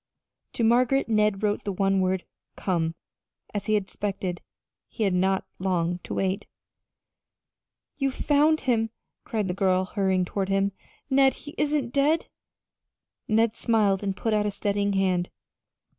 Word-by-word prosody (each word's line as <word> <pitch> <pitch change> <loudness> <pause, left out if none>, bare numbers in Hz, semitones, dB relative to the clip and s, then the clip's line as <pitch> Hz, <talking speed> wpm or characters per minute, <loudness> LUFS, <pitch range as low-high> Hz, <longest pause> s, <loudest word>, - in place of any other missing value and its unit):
To 235 - -1
Margaret 250 +4 +3
Ned 210 -2 +2
wrote 205 -1 0
the 200 - -2
one 195 0 +1
word 185 0 0 0.3
"Come," 175 -4 0
and 165 +1 -4 0.6
as 205 -1 -3
he 215 - +3
expected, 195 -2 -3 0.5
he 225 - -3
had 195 -3 +2
not 190 +1 +1
long 180 -2 0
to - - -6
wait. 190 +1 -1 1.5
"You 275 -2 +1
have 260 - -7
found 300 +2 +4
him!" 225 -4 +1 0.4
cried 215 -3 -1
the 180 - -1
girl, 185 -1 +2
hurrying 190 -2 +1
toward 195 +1 -2
him. 195 0 +2 0.4
"Ned, 270 0 +5
he 290 - -10
isn't 290 -5 0
dead!" 290 +4 +2 1.0
Ned 225 +1 +2
smiled 210 -5 +2
and 195 -2 -2
put 225 - -1
out 210 -1 +2
a - - +1
steadying 200 0 -1
hand. 185 -2 +1
200 Hz, 150 wpm, -26 LUFS, 190-230 Hz, 1.5 s, Ned